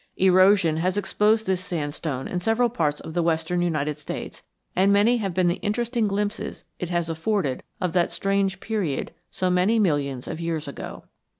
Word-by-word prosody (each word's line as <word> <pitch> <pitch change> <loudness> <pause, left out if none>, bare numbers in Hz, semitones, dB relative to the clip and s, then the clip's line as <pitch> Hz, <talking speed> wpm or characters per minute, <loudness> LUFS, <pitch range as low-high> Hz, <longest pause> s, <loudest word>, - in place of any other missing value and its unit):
Erosion 185 -3 +5
has 185 +4 0
exposed 215 +2 +2
this 185 -1 0
sandstone 145 -5 -3
in 180 - -2
several 225 +6 +2
parts 150 -9 0
of 160 - -8
the 175 - +1
western 165 +1 0
United 150 -4 0
States, 150 - -6 0.3
and 190 +2 +4
many 210 +5 +4
have 200 -4 -2
been 180 0 +2
the 175 - +1
interesting 230 +1 0
glimpses 205 +2 -3
it 180 - -3
has 175 -2 0
afforded 165 -4 -1 0.2
of 180 -3 -1
that 175 -2 +2
strange 195 -1 0
period 195 -12 -2 0.2
so 185 -1 -1
many 185 +6 +3
millions 145 - 0
of - - -5
years 165 -2 -2
ago. 140 - -7
180 Hz, 175 wpm, -24 LUFS, 160-205 Hz, 0.3 s, Erosion